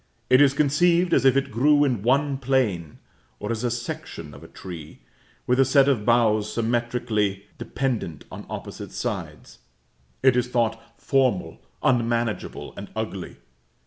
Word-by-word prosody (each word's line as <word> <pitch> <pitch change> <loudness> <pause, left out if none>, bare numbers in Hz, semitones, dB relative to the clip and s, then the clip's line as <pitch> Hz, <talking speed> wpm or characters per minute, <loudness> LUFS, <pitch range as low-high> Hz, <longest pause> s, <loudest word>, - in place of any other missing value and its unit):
It 130 +2 +7
is 140 -1 +5
conceived 170 +5 +3
as - - +3
if 135 0 +5
it 135 - -1
grew 145 +6 +4
in 125 -8 0
one 135 +4 +1
plane, 120 - 0 0.4
or 105 - -4
as 115 0 -3
a 120 - +1
section 120 - -6
of 70 - -13
a - - -11
tree, 85 -8 -10 0.4
with 125 +1 +1
a - - +7
set 135 +1 +4
of 120 -7 +1
boughs 110 -3 +3
symmetrically 115 -4 -1
dependent 120 - -3
on - - -9
opposite - - -7
sides. - - -5 0.6
It 130 -2 +5
is 125 -1 +1
thought 115 -2 0 0.2
formal, 130 -9 0 0.2
unmanageable, 120 -3 -1
and - - -8
ugly. - - -5
120 Hz, 145 wpm, -24 LUFS, 110-135 Hz, 0.6 s, It